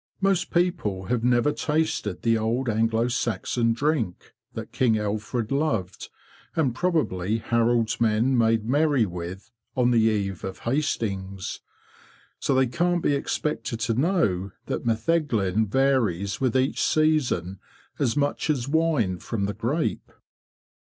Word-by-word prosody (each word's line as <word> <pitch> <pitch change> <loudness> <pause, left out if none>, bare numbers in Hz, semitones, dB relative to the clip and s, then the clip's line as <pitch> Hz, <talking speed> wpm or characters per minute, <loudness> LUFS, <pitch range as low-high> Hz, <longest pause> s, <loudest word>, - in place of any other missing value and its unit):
Most 195 -2 +1
people 170 - 0
have 120 -2 0
never 125 +3 +3
tasted 150 - -1
the 115 -1 +3
old 115 +4 -1
Anglo 115 +1 +1
Saxon 120 -1 0
drink 120 - -1 0.2
that - - -6
King 115 -4 +2
Alfred 110 +3 -2
loved, 125 - -1 0.5
and 140 -7 +1
probably 115 - 0
Harold's 115 0 +1
men 115 +4 +2
made 115 -2 +2
merry 145 -1 +3
with 90 +4 -7 0.3
on 125 -1 +3
the 120 - +4
eve 100 -4 0
of 95 -1 -6
Hastings. 100 -8 -2 0.8
So 135 - +1
they 130 0 +4
can't 175 +7 0
be 145 - +2
expected 140 -4 -2
to 115 +1 +1
know 120 - +1
that - - -3
metheglin 110 - +1
varies 110 -6 +1
with 130 -3 +1
each 130 +1 0
season 135 - +1 0.4
as 130 -1 +1
much 145 +2 0
as 135 -5 0
wine 145 - +1
from 100 0 -3
the 100 - -2
grape." 120 - -2
115 Hz, 130 wpm, -25 LUFS, 105-145 Hz, 0.8 s, the